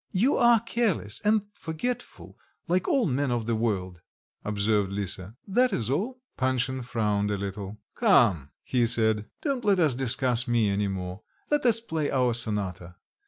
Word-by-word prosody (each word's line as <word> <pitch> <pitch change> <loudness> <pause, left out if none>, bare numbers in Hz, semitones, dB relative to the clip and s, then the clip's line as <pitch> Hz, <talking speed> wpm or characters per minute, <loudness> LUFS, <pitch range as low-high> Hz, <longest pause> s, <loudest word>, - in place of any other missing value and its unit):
"You 230 +9 +3
are 235 -1 +5
careless 220 - -1
and 210 0 +3
forgetful, 205 +8 -5 0.3
like 180 +2 +1
all 275 -9 +2
men 140 -1 0
of 120 -2 -1
the 115 - 0
world," 95 -6 -2 0.4
observed 105 -1 0
Lisa, 100 0 -4
"that 245 +5 +3
is 120 - -2
all." 235 - -2 0.2
Panshin 130 0 0
frowned 105 -4 0
a 105 - -1
little. 100 +1 -6 0.2
"Come," 115 - +3
he 120 -2 +1
said, 110 -2 +1 0.2
"don't 275 -5 -1
let 200 -3 +3
us 155 -6 +3
discuss 130 0 +1
me 115 -3 +2
any 100 +1 0
more; 95 0 -5 0.3
let 295 -4 +2
us 230 -1 +3
play 160 -10 -2
our 125 -2 +2
sonata. 100 -6 -1
120 Hz, 160 wpm, -27 LUFS, -, 0.4 s, are